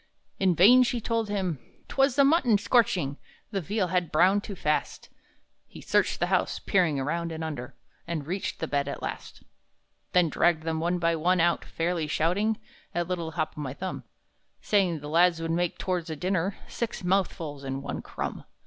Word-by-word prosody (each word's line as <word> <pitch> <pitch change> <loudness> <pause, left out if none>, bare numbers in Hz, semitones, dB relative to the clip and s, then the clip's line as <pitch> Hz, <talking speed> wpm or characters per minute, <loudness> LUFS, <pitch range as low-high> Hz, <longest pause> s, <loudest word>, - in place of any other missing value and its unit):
In 185 -3 +3
vain 230 +10 +7
she 245 -1 +1
told 230 -1 -1
him 185 -8 -1 0.3
'twas 270 -1 +2
the 280 - +5
mutton 275 -7 +4
scorching; 200 - +2 0.3
The 195 -3 -1
veal 190 +2 -1
had 180 -2 0
browned 190 +6 +4
too 200 - -6
fast; 150 -4 -2 0.6
He - - -12
searched - - +1
the - - +2
house, - - +1
peering 175 -8 +1
around 165 +5 -2
and 160 0 -5
under, 145 -6 -5 0.3
And 165 -4 -3
reached 185 +5 -3
the 160 - -2
bed 140 -1 0
at 140 - -5
last, - - -6 0.7
Then 180 -2 +5
dragged 160 +1 +2
them 160 -1 -1
one 175 +2 0
by 170 -1 +1
one 180 +3 +2
out, 170 0 +2
fairly 165 -1 -2
shouting 185 +8 +1 0.4
At 175 -1 0
little 170 -3 -3
Hop 155 0 -2
o'my 140 -3 -5
Thumb, 185 +4 -5 0.6
Saying 185 -7 +1
the 145 - -7
lads 170 +2 +4
would 165 0 -2
make, 175 +1 0
towards 180 -3 -2
a 160 - -3
dinner, 185 +3 -1
Six 235 -5 -4
mouthfuls 170 -6 -1
and 135 0 -4
one - - -4
crumb. - - -5
175 Hz, 180 wpm, -27 LUFS, 160-195 Hz, 0.7 s, vain